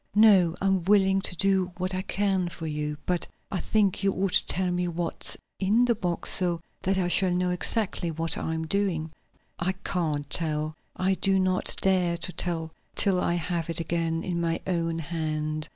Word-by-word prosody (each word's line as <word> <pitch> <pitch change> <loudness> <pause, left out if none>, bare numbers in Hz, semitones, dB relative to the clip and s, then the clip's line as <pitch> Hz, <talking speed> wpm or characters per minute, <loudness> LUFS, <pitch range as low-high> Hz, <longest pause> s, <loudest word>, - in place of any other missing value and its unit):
"No, 195 -6 +5
I'm 195 -1 +1
willing 195 -1 +3
to 185 - -2
do 190 0 +1
what 185 +1 -3
I 185 - -1
can 190 -2 -1
for 165 -1 -7
you. 150 -1 -3
But 180 -1 -1 0.2
I 190 - -2
think 200 +1 +1
you 195 -1 +2
ought 190 0 -2
to - - +3
tell 185 0 +1
me 180 0 -1
what's 170 0 -2 0.2
in 215 +6 +3
the 240 - +2
box, 180 -6 +1
so 175 -2 +6 0.2
that 190 +1 0
I 180 -2 +1
shall 185 +1 +3
know 180 0 0
exactly 180 -1 +2
what 165 0 -1
I 160 - -3
am 160 0 -3
doing." 165 -3 -1 0.5
"I 185 +2 0
can't 155 -6 -2
tell; 155 0 +2 0.2
I 190 +1 +1
do 195 +1 +1
not 185 -1 +2
dare 180 -3 +2
to 175 +1 -5
tell 165 -1 -2 0.2
till 185 -2 +2
I 170 - 0
have 170 -1 -3
it 165 - -2
again 165 0 -2
in 175 -2 -2
my 165 -1 -1
own 165 -2 -1
hand. 155 -1 -3
180 Hz, 190 wpm, -26 LUFS, 165-190 Hz, 0.5 s, so